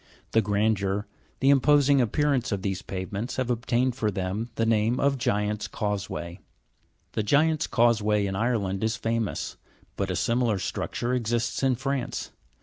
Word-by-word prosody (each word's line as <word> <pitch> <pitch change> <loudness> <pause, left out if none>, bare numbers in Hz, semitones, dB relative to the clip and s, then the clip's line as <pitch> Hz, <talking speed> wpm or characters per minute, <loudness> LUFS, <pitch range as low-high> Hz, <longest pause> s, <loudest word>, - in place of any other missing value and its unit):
The 115 - +4
gran 105 +1 +2
deur, 100 0 -2 0.4
the 135 +1 +5
imposing 140 0 +5
appearance 130 +1 +1
of 100 -2 -2
these 95 -3 -2
pavements, 100 +5 -4
have 130 -1 -1
obtained 120 +1 0
for 110 -4 0
them 100 +4 -3
the 115 - +1
name 115 +2 +2
of 140 -1 +2
Giants 105 -2 0
1 - - -14
Causeway. 100 -4 -3 0.7
The - - -1
Giants' 150 +7 +2
Causeway 110 -3 +2
in 95 -1 -2
Ireland 100 -3 0
is 110 0 +1
famous; 115 0 -2 0.4
but - - -1
a - - -1
similar 115 -3 +1
structure 120 +5 -2
exists 120 -1 -1
in 135 -2 +3
France. 135 0 -3
115 Hz, 155 wpm, -26 LUFS, 105-125 Hz, 0.7 s, the